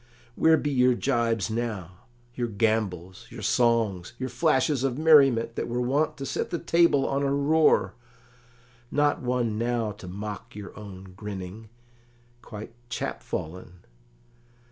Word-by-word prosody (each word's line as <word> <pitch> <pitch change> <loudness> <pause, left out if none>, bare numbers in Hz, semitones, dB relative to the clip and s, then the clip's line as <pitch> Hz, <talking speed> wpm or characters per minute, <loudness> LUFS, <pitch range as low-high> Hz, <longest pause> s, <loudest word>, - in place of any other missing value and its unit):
Where 160 +5 +4
be 145 - -2
your 125 -2 +4
jibes 115 -5 0
now? 110 -6 -3 0.4
your 120 -1 -2
gambols? 105 -2 -1
your 115 -2 -9
songs? 110 -5 +1
your 130 0 -3
flashes 130 +2 +1
of 135 -2 0
merriment 135 -7 +5
that - - -2
were 120 +1 -2
wont 145 +5 0
to 135 - -5
set 135 - -2
the 170 - -2
table 170 -5 +3
on 140 0 0
a 140 -1 +1
roar? 150 +3 +3 1.0
Not 145 0 +1
one 120 -3 -1
now 120 -2 0
to 105 -2 -11
mock 105 +4 -7
your 105 -2 -9
own 95 -3 -10
grinning? 105 +1 -7 0.7
quite 110 0 -9 0.2
chap 120 - -4
fallen? 90 +2 -7
115 Hz, 140 wpm, -26 LUFS, 105-135 Hz, 1.0 s, merriment